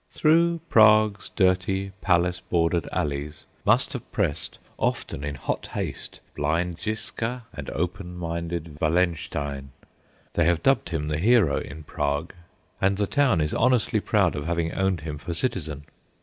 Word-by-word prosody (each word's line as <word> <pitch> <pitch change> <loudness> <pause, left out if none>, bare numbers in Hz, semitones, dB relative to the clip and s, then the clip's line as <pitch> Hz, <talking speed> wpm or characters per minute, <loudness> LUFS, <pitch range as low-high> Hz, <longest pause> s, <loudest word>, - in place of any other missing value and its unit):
Through 170 +2 +3
Prague's 110 -4 +5
dirty, 95 0 +1
palace 90 0 +2
bordered 85 -1 0
alleys 75 0 -3 0.2
must - - +3
have - - -7
pressed 80 +2 -1 0.2
often 70 - -1
in 75 0 -3
hot 65 - -3
haste - - -5
blind 85 +4 -1
Ziska 115 +3 -3
and 75 - -6
open 90 +1 -3
minded 85 -2 -4
Wallenstein 75 -5 0 0.6
they 85 - +2
have 85 -1 +2
dubbed 135 -9 +3
him 80 -3 -2
"The 75 0 -1
Hero" 105 -5 +4
in 75 +3 -8
Prague; 75 +2 -2 0.5
and 95 0 +3
the 105 - +1
town 125 - +2
is 75 0 -1
honestly 125 -3 +2
proud 100 -5 +2
of 75 +1 -4
having 85 -1 0
owned 95 -3 0
him 75 -1 -5
for 85 +2 -4
citizen. 80 - -2
85 Hz, 145 wpm, -25 LUFS, 75-100 Hz, 0.6 s, Prague's